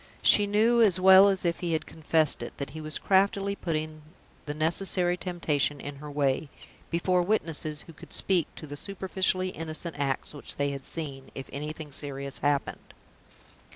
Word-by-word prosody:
She 205 -1 +6
knew, 225 +4 +3
as 195 -5 +4
well 190 +1 +8
as 190 -2 -1
if 170 0 0
he 170 -2 -2
had 160 - -1
confessed 160 -1 +1
it, - - -7
that 140 - -5
he 155 - -7
was 155 0 -2
craftily 200 +1 +2
putting 155 -3 -4 0.5
the 145 - -3
necessary 175 +3 +2
temptation 155 -6 -1
in 145 0 -7
her 150 +1 -9
way, 140 0 0 0.4
before 180 +2 +1
witnesses 165 -6 -1
who 165 - -13
could - - -14
speak 180 -5 +2
to - - -9
the 145 -1 -7
superficially 190 0 0
innocent 165 -1 -5
acts 135 0 -1
which 145 - -4
they 140 0 0
had 140 -1 -7
seen, 140 -5 -3
if 135 - -6
anything 150 +1 -6
serious 140 -1 -5
happened. 145 -1 -2
160 Hz, 170 wpm, -28 LUFS, 145-185 Hz, 0.5 s, well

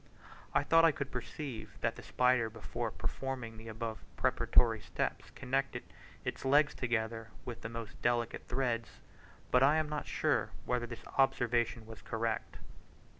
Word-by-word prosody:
I - - +5
thought 165 0 +6
I 165 - +7
could 140 -1 -4
perceive 125 -4 -5
that 115 0 +1
the - - -9
spider, 125 -2 +3
before 110 -1 -4
performing 125 -4 -4
the 110 +1 -10
above 110 0 -4 0.2
preparatory - - +4
steps, - - -2
connected 135 +2 -1 0.4
its - - -3
legs 145 +2 +5
together 115 -2 -1 0.2
with 120 - -6
the 110 - -4
most 115 -2 -7
delicate 120 -1 0
threads, 120 -3 -1 0.5
but 125 - +6
I 140 +3 +6
am 155 -1 +2
not 150 -1 -3
sure - - +1 0.2
whether 125 -1 0
this 120 -1 -8
observation 120 -3 +2
was 110 -1 -10
correct. 115 0 -2
120 Hz, 150 wpm, -34 LUFS, 115-135 Hz, 0.5 s, I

